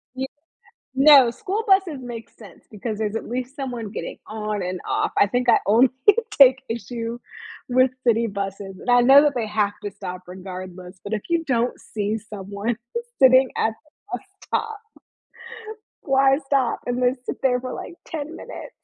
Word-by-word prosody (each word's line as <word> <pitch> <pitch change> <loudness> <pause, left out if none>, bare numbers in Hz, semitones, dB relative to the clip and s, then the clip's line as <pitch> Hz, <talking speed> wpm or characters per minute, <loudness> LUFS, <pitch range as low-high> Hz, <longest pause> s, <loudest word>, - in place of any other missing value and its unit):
You 265 +1 -3 0.7
No, 270 -3 +7
school 425 - -3
buses 380 -7 +3
make 235 -2 -8
sense 215 - -16
because 215 +1 -5
there's 215 0 -2
at - - -4
least 255 +2 -4
someone 245 -6 -5
getting - - -6
on 215 -1 -3
and 180 0 -3
off. - - 0
I 200 - +5
think 245 +3 0
I - - +6
only 235 +5 +5 0.4
take 265 -1 +6
issue 230 +1 -4 0.5
with 255 +1 +4 0.2
city 230 0 +3
buses, 195 -1 -5
and - - -6
I 245 0 +6
know 270 +3 +8
that 295 - +2
they 230 -3 -1
have 210 -1 0
to 205 - -4
stop 185 -1 -7
regardless, 185 0 -9
but, 200 - -5
if 210 - -2
you 335 -1 +1
don't 245 -2 0
see 215 0 -3
someone 205 +1 -4 0.4
sitting 260 -1 +6
at - - +2 0.4
the - - -1
bus - - -24 0.2
stop, 440 -2 -2 1.2
why 270 0 +3
stop 270 -3 +1
and 245 +1 -2
then 250 +1 +3
sit - - -4
there 250 -2 +2
for 255 - -5
like 340 - -8
10 315 0 -6
minutes? - - -9
240 Hz, 170 wpm, -23 LUFS, 205-265 Hz, 1.2 s, know